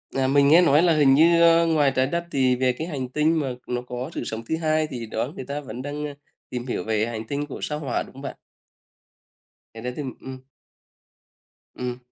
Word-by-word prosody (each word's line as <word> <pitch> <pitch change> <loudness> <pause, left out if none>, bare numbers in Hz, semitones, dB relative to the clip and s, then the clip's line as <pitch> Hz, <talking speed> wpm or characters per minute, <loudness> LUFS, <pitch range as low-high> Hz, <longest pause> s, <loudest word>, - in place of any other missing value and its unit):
À, 135 -1 +2
mình 140 +1 +4
nghe 165 +5 +7
nói 155 0 +5
là 170 -2 +4
hình 140 -3 +5
như, 170 +3 +5
a, 170 0 +6
ngoài 150 -4 +3
Trái 130 0 +2
Đất 170 +3 -2
thì 130 -2 +2
về 125 0 +1
cái 160 +7 -5
hành 135 -6 -4
tinh 155 +3 +2
mà 135 -4 -2
nó 125 0 -2
có 125 +4 -5
sự - - -4
sống 110 0 -4
thứ 160 - 0
hai 155 -1 +1
thì 120 -5 -6
đó 115 +5 -3
người 130 - -7
ta 145 +2 -4
vẫn 125 -1 -7
đang, 145 +2 -4
a, 145 - -7 0.4
tìm 125 0 -5
hiểu 90 - -2
về 110 0 0
hành 110 -1 -5
tinh 145 +1 -2
của 140 - -8
Sao 150 0 -2
Hỏa, 135 -5 -2
đúng - - -15
không 135 - -11
bạn? 140 - -6 1.4
Cái 115 +1 -10
đấy 125 0 -3
tìm 140 -4 -5
ừm. 130 -1 -8 1.4
Ừm. 125 -1 -4
140 Hz, 230 wpm, -24 LUFS, 125-155 Hz, 1.4 s, nghe